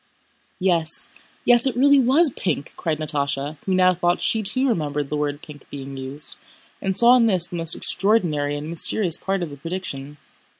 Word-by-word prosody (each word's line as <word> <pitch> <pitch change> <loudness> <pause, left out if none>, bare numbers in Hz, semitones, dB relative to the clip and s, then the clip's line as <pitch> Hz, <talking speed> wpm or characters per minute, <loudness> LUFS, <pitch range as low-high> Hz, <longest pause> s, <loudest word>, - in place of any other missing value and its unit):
"Yes, 170 -4 -1 0.3
yes, 245 +1 +6
it 250 -3 -2
really 285 +2 +5
was 275 +5 +3
pink!" 175 - -4
cried 160 -2 -3
Natásha, 145 -1 -3
who 190 - +1
now 185 0 +4
thought 175 0 0
she 220 - 0
too 235 +6 +2
remembered 150 - -2
the - - -1
word 145 0 -3
pink 150 -2 -14
being 135 -1 -8
used, 135 +3 -4 0.4
and 190 -1 -2
saw 240 +3 +6
in 230 -2 +3
this 185 -5 +3
the 175 - -8
most 165 0 0
extraordinary 170 -8 +1
and 145 +1 -6
mysterious 170 +2 +2
part 195 -1 -2
of 160 - -6
the 145 - -10
prediction. 145 -3 -6
170 Hz, 180 wpm, -22 LUFS, 145-205 Hz, 0.4 s, yes